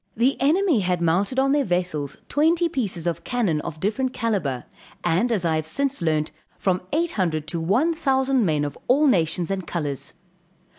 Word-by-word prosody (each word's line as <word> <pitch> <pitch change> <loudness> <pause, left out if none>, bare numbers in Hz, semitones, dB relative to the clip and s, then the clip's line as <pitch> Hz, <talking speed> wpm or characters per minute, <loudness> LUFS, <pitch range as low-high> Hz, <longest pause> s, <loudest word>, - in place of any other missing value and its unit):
The 250 +4 +3
enemy 320 - +3
had 180 -2 0
mounted 175 +9 +1
on 270 +1 +3
their 290 0 +3
vessels 175 - -1
twenty 330 +4 +2
pieces 210 - -3
of 170 -1 -2
cannon 210 -12 0
of 155 - -7
different 250 +8 -1
calibre; 190 - -1 0.4
and 180 +8 +1
as 200 -6 +1
I 160 -1 +2
have 155 0 -3
since 275 +7 -1
learnt, 155 -2 0 0.3
from 185 -1 0
eight 335 +3 +1
hundred, 165 - -1
to 170 - -3
one 240 - +2
thousand 270 -5 +1
men 155 -5 +1
of 145 - -5
all 280 +5 +4
nations 170 - +2
and 190 -2 -3
colors. 145 -3 -3
195 Hz, 180 wpm, -23 LUFS, 165-265 Hz, 0.4 s, all